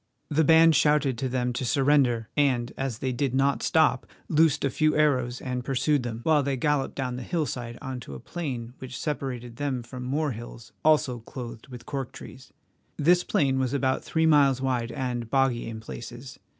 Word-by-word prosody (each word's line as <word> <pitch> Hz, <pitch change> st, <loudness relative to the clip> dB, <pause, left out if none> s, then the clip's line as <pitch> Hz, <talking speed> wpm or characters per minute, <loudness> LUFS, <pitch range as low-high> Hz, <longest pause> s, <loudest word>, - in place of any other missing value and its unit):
The 155 Hz, +2 st, +2 dB
band 160 Hz, +1 st, +6 dB
shouted 150 Hz, -3 st, +3 dB
to 135 Hz, -1 st, -1 dB
them 125 Hz, -1 st, -1 dB
to 125 Hz, -, -3 dB
surrender, 130 Hz, -4 st, +2 dB
and, 130 Hz, -5 st, +1 dB
as 135 Hz, -4 st, -3 dB
they 130 Hz, -, +1 dB
did 130 Hz, +1 st, -1 dB
not 135 Hz, +1 st, +2 dB
stop, 155 Hz, -5 st, +2 dB, 0.2 s
loosed 155 Hz, -2 st, +3 dB
a 140 Hz, -, 0 dB
few 155 Hz, +2 st, +2 dB
arrows 130 Hz, -5 st, +2 dB
and 125 Hz, -1 st, -4 dB
pursued 140 Hz, +2 st, +1 dB
them, 120 Hz, -1 st, -5 dB
while 155 Hz, -2 st, +4 dB
they 140 Hz, -1 st, -1 dB
galloped 145 Hz, 0 st, 0 dB
down 125 Hz, -2 st, -3 dB
the -, -, -5 dB
hillside 125 Hz, -6 st, -3 dB
on 130 Hz, -2 st, -4 dB
to 70 Hz, -, -9 dB
a -, -, -8 dB
plain 125 Hz, -, -5 dB
which 130 Hz, -1 st, -7 dB
separated 125 Hz, -6 st, -4 dB
them 135 Hz, -4 st, -2 dB
from 125 Hz, +2 st, -9 dB
more 145 Hz, +4 st, -1 dB
hills 115 Hz, 0 st, -9 dB
also 150 Hz, -6 st, +3 dB
clothed 115 Hz, 0 st, -9 dB
with 125 Hz, -3 st, -10 dB
cork 135 Hz, -3 st, -4 dB
trees. 130 Hz, +2 st, -12 dB, 0.5 s
This 175 Hz, +4 st, +4 dB
plain 135 Hz, -2 st, +1 dB
was 130 Hz, 0 st, 0 dB
about 130 Hz, -1 st, 0 dB
three 160 Hz, 0 st, 0 dB
miles 140 Hz, -4 st, +4 dB
wide 125 Hz, -3 st, -1 dB
and 120 Hz, -3 st, -3 dB
boggy 135 Hz, -3 st, +1 dB
in 110 Hz, -1 st, -6 dB
places. 120 Hz, +3 st, -9 dB
130 Hz, 190 wpm, -26 LUFS, 120-145 Hz, 0.5 s, band